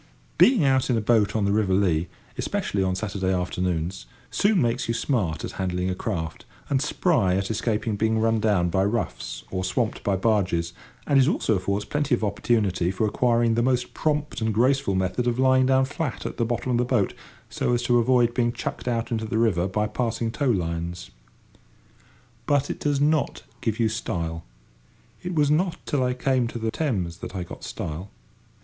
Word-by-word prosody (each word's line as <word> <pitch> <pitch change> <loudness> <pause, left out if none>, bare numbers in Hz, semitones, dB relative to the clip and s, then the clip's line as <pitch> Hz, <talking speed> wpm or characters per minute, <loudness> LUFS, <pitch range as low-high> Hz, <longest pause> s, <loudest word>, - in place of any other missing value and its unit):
Being 235 - +6
out 135 -1 +2
in 120 - +2
a - - +2
boat 110 -2 +2
on 105 -2 +1
the 100 - +2
river 100 -3 +2
Lea, 90 -4 +2 0.3
especially 100 - -1
on 95 -1 +1
Saturday 95 -2 -2
afternoons, 90 -1 -2 0.2
soon 205 -1 +3
makes 120 -1 0
you 115 - 0
smart 110 - -1
at - - -6
handling 90 0 -1
a - - 0
craft, 90 -4 -4 0.3
and 135 -2 +2
spry 145 - +2
at 95 +2 -1
escaping 110 -1 -1
being 110 +1 +1
run 115 0 +2
down 100 -5 +2
by 95 +1 +2
roughs 100 - -3
or 95 -1 -2
swamped 95 +5 -1
by 100 - +1
barges; 95 -5 +1 0.3
and 140 -2 +4
it 130 - +3
also 130 - +1
affords 100 +1 -1
plenty 145 -1 +1
of 115 - -6
opportunity 100 -4 +1
for 95 +4 0
acquiring 115 +1 +2
the 115 - +2
most 125 0 0
prompt 150 -4 -1
and 110 -1 0
graceful 130 -2 +2
method 95 +6 0
of 120 0 +1
lying 130 0 +4
down 130 0 +4
flat 140 -1 -4
at - - -5
the 115 - +1
bottom 120 +2 -2
of 120 - +2
the - - +3
boat 120 -6 +1 0.3
so - - -1
as 120 0 +1
to 120 0 +3
avoid 120 0 +3
being 120 -1 +1
chucked 120 - -5
out 115 -1 -1
into 110 -1 -1
the 110 +1 -2
river 100 -6 +2
by 105 +2 0
passing 115 +1 -2
tow 140 +2 0
lines. 85 -3 -2 1.4
But 145 -1 +2
it - - -6
does 145 -2 0
not 150 0 +1 0.2
give 115 -1 -1
you 115 - +3
style. 85 -7 -3 0.8
It 180 -1 -4
was 145 -2 +3
not 170 +3 +1
till 140 -3 0
I 125 0 0
came 130 -1 +1
to 120 - -6
the 110 -1 -2
Thames 95 - -2
that 95 - -8
I 90 - -2
got 85 - -10
style. 80 +6 -5
110 Hz, 195 wpm, -25 LUFS, 95-125 Hz, 1.4 s, Being